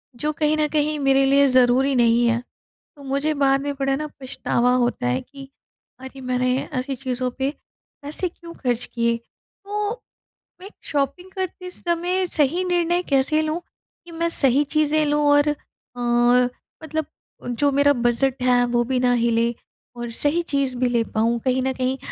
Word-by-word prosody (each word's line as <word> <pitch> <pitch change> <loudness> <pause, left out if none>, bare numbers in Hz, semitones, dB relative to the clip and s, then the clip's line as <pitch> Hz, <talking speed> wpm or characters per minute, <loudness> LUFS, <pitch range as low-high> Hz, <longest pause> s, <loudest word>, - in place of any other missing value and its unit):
जो 300 +5 -2
कहीं 305 0 +1
न 305 -1 +2
कहीं 300 0 +1
मेरे 270 0 +3
लिए 280 +1 +5
ज़रूरी 255 +1 +3
नहीं 235 0 +4
हैं। 235 +1 0 0.5
तो 285 - -14
मुझे 280 +3 0
बाद 275 -2 +2
में 285 0 -3
बड़ा 270 0 +1
ना 305 +2 -4
पछतावा 250 -1 0
होता 240 - 0
है 125 +1 0
कि, 275 -1 -13 0.5
अरे 265 +1 -10
मैंने 255 0 0 0.2
ऐसी 260 +1 -2
चीज़ों 255 -1 -2
पे, 270 +1 +1 0.5
पैसे 305 +6 -2
क्यों 335 0 -12
ख़र्च 245 -5 -2
किए। 235 -1 +1
तो 410 - -7 0.7
मैं 375 - -10
एक 410 - -13
शॉपिंग 295 +6 -2
करते 370 -1 -5
समय 355 +1 -1
सही 315 +5 +2
निर्णय 350 0 +1
कैसे 275 +3 +2
लूँ, 310 +2 -2 0.4
कि 340 - -13
मैं 335 +1 -1
सही 275 -2 +3
चीज़ें 305 +1 +1
लूँ 295 0 +1
और 290 +1 +4
अ, 295 - +1 1.3
मतलब 315 0 -3 0.4
जो 280 +4 +1
मेरा 285 +1 +4
बजट 250 +1 0
है, 250 -1 +4
वो 240 0 +1
भी 255 +1 -1
ना 250 -1 +3
हिले 235 0 +1 0.4
और 240 -1 -5
सही 305 +4 +1
चीज़ 275 -3 0
भी 250 0 +2
ले 235 -1 +1
पाऊँ, 230 +2 +1
कहीं 260 0 +1
न 265 - 0
कहीं 260 +1 -1
275 Hz, 170 wpm, -22 LUFS, 250-305 Hz, 1.3 s, लिए